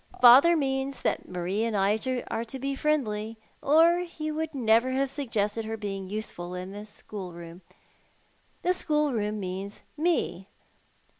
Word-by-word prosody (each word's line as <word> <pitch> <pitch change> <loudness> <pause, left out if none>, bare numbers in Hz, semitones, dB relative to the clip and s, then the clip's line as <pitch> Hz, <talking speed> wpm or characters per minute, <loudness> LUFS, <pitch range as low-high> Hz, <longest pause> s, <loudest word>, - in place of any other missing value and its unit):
Father 270 +8 +8
means 270 -1 -1
that - - -1
Marie 180 +4 -1
and 225 -2 0
I 200 +2 +2 0.3
are 225 - -1
to 235 +3 -7
bo 275 +1 -2
friendly, 225 -8 -1 0.2
or 330 +4 +5
he 320 -3 -4
would 315 0 -3
never 235 +1 +3
have 270 0 0
suggested 225 -6 -1
her 225 0 -4
being 195 -3 -5
useful 180 -4 -5
in 180 +1 -6
the 205 +1 -8
schoolroom. 175 -5 -9 1.0
The 360 - +3
schoolroom 275 - 0
means 190 +2 -5
me. 310 - 0
225 Hz, 140 wpm, -27 LUFS, 200-280 Hz, 1.0 s, Father